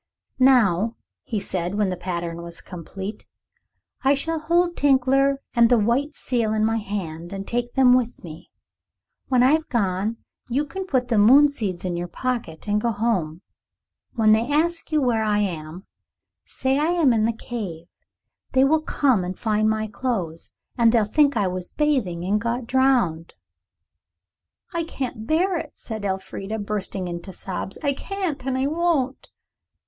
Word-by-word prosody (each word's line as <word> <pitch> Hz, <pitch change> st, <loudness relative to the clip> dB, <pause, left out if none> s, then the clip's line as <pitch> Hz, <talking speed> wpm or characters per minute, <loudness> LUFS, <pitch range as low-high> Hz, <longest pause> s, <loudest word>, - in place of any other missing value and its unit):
"Now," 230 Hz, -5 st, +4 dB, 0.3 s
he 220 Hz, -, -3 dB
said, 185 Hz, -1 st, -3 dB
when 205 Hz, -2 st, +1 dB
the 180 Hz, -, -2 dB
pattern 170 Hz, -2 st, -4 dB
was 170 Hz, 0 st, -7 dB
complete, 190 Hz, +4 st, -8 dB, 0.8 s
"I 275 Hz, +1 st, +4 dB
shall 325 Hz, +4 st, -2 dB
hold 345 Hz, +2 st, +1 dB
Tinkler 275 Hz, 0 st, +3 dB
and 235 Hz, -1 st, +5 dB
the 245 Hz, -, +5 dB
white 250 Hz, +7 st, +1 dB
seal 230 Hz, -4 st, -1 dB
in 215 Hz, 0 st, +2 dB
my 225 Hz, +1 st, +1 dB
hand 175 Hz, -6 st, -5 dB
and 195 Hz, 0 st, -6 dB
take 240 Hz, 0 st, -2 dB
them 260 Hz, -2 st, +6 dB
with 250 Hz, -2 st, 0 dB
me. 170 Hz, +1 st, -10 dB, 0.8 s
When 250 Hz, -2 st, +3 dB
I've 310 Hz, +5 st, +3 dB
gone, 205 Hz, -1 st, 0 dB, 0.3 s
you 275 Hz, +5 st, 0 dB
can 380 Hz, +6 st, -6 dB
put 255 Hz, -6 st, 0 dB
the 225 Hz, -4 st, +3 dB
moon 265 Hz, +8 st, +7 dB
seeds 200 Hz, -10 st, -4 dB
in 180 Hz, -1 st, -1 dB
your 175 Hz, +1 st, -3 dB
pocket 230 Hz, -7 st, -4 dB
and 210 Hz, 0 st, +1 dB
go 235 Hz, -, +1 dB
home. 200 Hz, -7 st, -1 dB, 0.7 s
When 220 Hz, -2 st, +3 dB
they 225 Hz, +5 st, +3 dB
ask 330 Hz, +3 st, 0 dB
you 310 Hz, -, +3 dB
where 235 Hz, -3 st, +2 dB
I 210 Hz, -1 st, +1 dB
am, 175 Hz, -3 st, -3 dB, 0.6 s
say 265 Hz, +1 st, 0 dB
I 320 Hz, +4 st, +2 dB
am 315 Hz, -8 st, +4 dB
in 220 Hz, -1 st, +2 dB
the 230 Hz, -, +2 dB
cave. 210 Hz, -8 st, -6 dB, 0.7 s
They 260 Hz, 0 st, +5 dB
will 310 Hz, +3 st, +3 dB
come 265 Hz, -, +2 dB
and 180 Hz, +1 st, -5 dB
find 215 Hz, -1 st, +1 dB
my 220 Hz, 0 st, 0 dB
clothes, 205 Hz, -7 st, -3 dB, 0.3 s
and 230 Hz, -1 st, +6 dB
they'll 225 Hz, -3 st, +3 dB
think 285 Hz, +3 st, +3 dB
I 205 Hz, -, +2 dB
was 185 Hz, -1 st, -3 dB
bathing 240 Hz, -, 0 dB
and 205 Hz, +2 st, +1 dB
got 235 Hz, +1 st, -2 dB
drowned." 245 Hz, -11 st, +1 dB, 1.4 s
"I 335 Hz, 0 st, -1 dB
can't 250 Hz, -8 st, -5 dB
bear 350 Hz, +3 st, +2 dB
it," 300 Hz, -, -8 dB
said 220 Hz, -3 st, -6 dB
Elfrida, 195 Hz, +2 st, -4 dB
bursting 200 Hz, -3 st, -3 dB
into 175 Hz, +2 st, -6 dB
sobs. 190 Hz, +1 st, -6 dB
"I 285 Hz, -1 st, +2 dB
can't, 355 Hz, -3 st, -4 dB
and 260 Hz, -1 st, 0 dB
I 260 Hz, -, +1 dB
won't." 300 Hz, -4 st, 0 dB
225 Hz, 165 wpm, -23 LUFS, 190-270 Hz, 1.4 s, moon